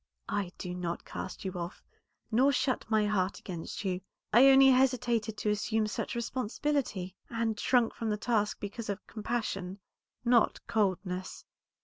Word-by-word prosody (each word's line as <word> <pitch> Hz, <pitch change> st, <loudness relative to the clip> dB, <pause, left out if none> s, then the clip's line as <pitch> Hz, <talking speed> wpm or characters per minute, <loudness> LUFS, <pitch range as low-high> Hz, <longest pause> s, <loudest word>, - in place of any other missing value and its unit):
"I 200 Hz, -3 st, -1 dB
do 180 Hz, -1 st, -5 dB
not 175 Hz, -1 st, -4 dB
cast 185 Hz, -, -6 dB
you 190 Hz, -, -1 dB
off, 175 Hz, -1 st, -6 dB, 0.5 s
nor 260 Hz, +5 st, +5 dB
shut 255 Hz, -3 st, 0 dB
my 215 Hz, -1 st, +3 dB
heart 195 Hz, -2 st, 0 dB
against 175 Hz, +2 st, -6 dB
you. 185 Hz, -1 st, -1 dB, 0.3 s
I 245 Hz, +5 st, +8 dB
only 270 Hz, 0 st, +8 dB
hesitated 240 Hz, -4 st, +2 dB
to 210 Hz, -, 0 dB
assume 215 Hz, +1 st, 0 dB
such 210 Hz, -, -3 dB
responsibility, 235 Hz, -4 st, -2 dB
and 225 Hz, -2 st, -1 dB
shrunk 245 Hz, -3 st, +3 dB
from 225 Hz, -, -3 dB
the 210 Hz, -, 0 dB
task 210 Hz, -1 st, 0 dB
because 205 Hz, +2 st, -6 dB
of 200 Hz, 0 st, -4 dB
compassion, 210 Hz, -4 st, -3 dB, 0.5 s
not 235 Hz, -1 st, +4 dB
coldness. 185 Hz, -3 st, -1 dB
215 Hz, 145 wpm, -31 LUFS, 190-235 Hz, 0.5 s, I